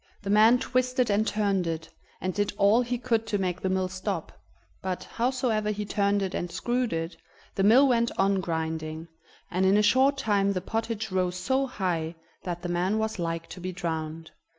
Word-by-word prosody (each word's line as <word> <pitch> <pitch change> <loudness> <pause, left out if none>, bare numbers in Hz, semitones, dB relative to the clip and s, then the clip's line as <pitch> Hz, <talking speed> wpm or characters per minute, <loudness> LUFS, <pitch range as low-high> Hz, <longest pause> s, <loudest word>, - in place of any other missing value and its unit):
The 200 - -2
man 220 +4 +6
twisted 255 -1 +1
and 215 +2 +2
turned 200 -4 +1
it, 165 0 -3 0.3
and 185 0 -2
did 205 +1 -1
all 205 +4 +5
he 245 0 -2
could 230 -2 0
to 210 - 0
make 185 -2 -2
the 190 - 0
mill 185 0 +1
stop, 185 -2 -4 0.5
but, 185 -1 -3
howsoever 240 -3 0
he 210 0 -2
turned 200 0 +1
it 190 - -3
and 175 - -3
screwed 245 +3 -1
it, 165 +1 -3 0.4
the - - -1
mill 240 +8 +6
went 235 -2 +2
on 195 0 +2
grinding, 160 -1 -3 0.4
and 185 +1 +1
in 190 +2 +5
a 210 - +4
short 265 +5 +4
time 200 -5 +1
the 185 - -1
pottage 220 +1 -3
rose 180 -1 0
so 265 +9 0
high 175 -8 -2 0.3
that 175 -1 -5
the - - -2
man 180 +4 0
was 220 -2 -2
like 165 -1 -2
to - - -9
be 185 +1 -3
drowned. 160 -3 -4
200 Hz, 195 wpm, -27 LUFS, 180-225 Hz, 0.5 s, man